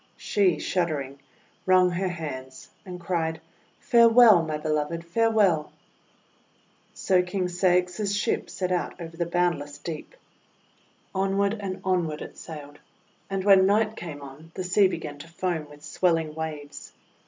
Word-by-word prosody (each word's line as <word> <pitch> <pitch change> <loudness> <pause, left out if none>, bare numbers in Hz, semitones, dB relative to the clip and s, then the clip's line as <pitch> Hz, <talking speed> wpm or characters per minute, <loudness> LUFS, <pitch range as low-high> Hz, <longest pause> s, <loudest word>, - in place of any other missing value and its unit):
She, 190 -6 +1
shuddering, 150 -6 -2 0.5
wrung 185 -1 +5
her 185 +2 -1
hands 130 -7 -7 0.2
and 180 -1 -7
cried: 165 -2 -2 0.2
— - - -36
"Farewell! 230 -5 +7
my 155 -2 -3
Beloved, 155 +2 -2
farewell!' 200 -5 +2 1.2
So 185 -1 +2
King 180 +1 -2
Ceyx's 180 +3 +1
ship - - -1
set 185 -1 -3
out 180 0 -2
over 165 -1 -8
the 170 0 -2
boundless 170 -5 -1
deep. 165 - -7 1.0
Onward 195 +1 +1
and 190 -2 -5
onward 175 -5 -1
it - - -11
sailed; 145 -2 -10 0.5
and 195 -1 -2
when 190 -1 +6
night 215 +2 +2
came 150 -7 -8
on 140 +4 -12
the 185 - -3
sea 190 +2 +4
began 150 -5 -6
to 155 - -10
foam 170 -3 -3
with 145 0 -15
swel 180 -3 +2
ling 160 -2 -3
waves. 150 -2 -7
175 Hz, 140 wpm, -26 LUFS, 155-190 Hz, 1.2 s, Farewell